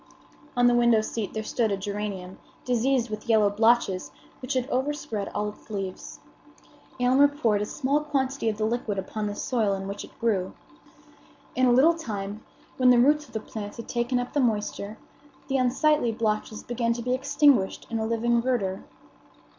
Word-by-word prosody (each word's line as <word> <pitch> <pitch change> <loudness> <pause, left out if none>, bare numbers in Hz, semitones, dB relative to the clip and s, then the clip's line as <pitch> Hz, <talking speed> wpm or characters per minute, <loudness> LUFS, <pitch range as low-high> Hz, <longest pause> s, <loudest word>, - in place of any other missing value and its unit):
On 245 - +4
the 245 - +5
window 235 -2 +4
seat 215 -1 -4
there 220 - -2
stood 225 0 0
a 200 - 0
geranium 200 -2 -5 0.3
diseased 245 -1 +1
with 215 +2 -6
yellow 215 -3 +4
blotches, 205 -6 +2 0.3
which 255 +2 -3
had 255 -1 0
overspread 260 -6 -2
all 210 0 -1
its 210 - -15
leaves. 195 -3 -5 0.8
Aylmer 260 +3 +5
poured 235 -8 0
a 210 - -2
small 280 +4 0
quantity 270 -5 -1
of 210 - -3
the 215 - 0
liquid 220 -2 -2
upon 210 +2 -3
the 205 - -4
soil 220 -6 0
in 195 0 -5
which 200 +1 -5
it - - -14
grew. 200 -5 0 1.0
In 255 0 +3
a - - +5
little 275 +7 +6
time, 210 -9 -5 0.3
when 255 -1 +5
the 250 - +6
roots 295 +4 +4
of - - -20
the 220 - -1
plant 210 -1 -7
had 230 - -8
taken 240 +1 0
up 245 - -5
the 290 - +1
moisture, 215 -3 -1 0.5
the 270 - +1
unsightly 260 +1 +2
blotches 215 -1 -2
began 235 -1 0
to 235 0 -5
be 250 +1 0
extinguished 280 -5 +2
in 225 - -1
a 220 - -1
living 235 +1 +1
verdure. 220 -7 -1
230 Hz, 180 wpm, -26 LUFS, 210-255 Hz, 1.0 s, little